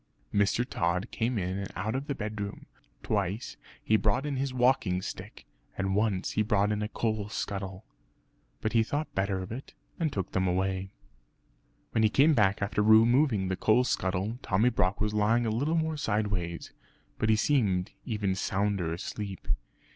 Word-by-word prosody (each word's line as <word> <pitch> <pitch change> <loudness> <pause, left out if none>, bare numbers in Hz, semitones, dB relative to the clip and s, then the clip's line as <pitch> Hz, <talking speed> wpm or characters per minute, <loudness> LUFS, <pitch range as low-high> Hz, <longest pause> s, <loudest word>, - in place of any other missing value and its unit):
Mr. 100 +4 +2
Tod 90 0 -1
came 120 +1 -1
in 95 0 -2
and 100 - -5
out 105 +4 -2
of 135 +2 -3
the 140 - -2
bedroom. 105 -2 -5 0.4
Twice 100 +1 -1 0.3
he 110 - +4
brought 105 +6 +1
in 145 -2 -2
his 135 0 -1
walking 125 -7 +2
stick, - - -8 0.3
and 95 0 0
once 105 -3 +1
he - - +1
brought 105 -1 +2
in 105 - 0
the 105 - -1
coal 110 -2 -2
scuttle. 95 -1 -4 0.8
But 110 - -1
he 115 - +5
thought 145 +7 -2
better 95 0 0
of 90 - -9
it, 130 +4 -8 0.2
and 160 -3 +1
took 95 -6 -3
them 95 0 +1
away. 95 +1 0 1.0
When 110 - +1
he 110 - +5
came 145 +8 +5
back 100 -4 +3
after 105 +1 0
removing 110 0 +5
the 95 - -1
coal 110 +6 +3
scuttle, 100 -1 -1
Tommy 105 +6 +2
Brock 95 -5 0
was 105 0 0
lying 110 +3 +2
a 110 - 0
little 145 +9 0
more 160 -1 0
sideways; 100 -9 -2 0.5
but 110 - +1
he 110 - +6
seemed 105 -7 +1
even 105 -4 -1
sounder 95 -2 0
asleep. 95 +2 -5
105 Hz, 170 wpm, -29 LUFS, 95-115 Hz, 1.0 s, he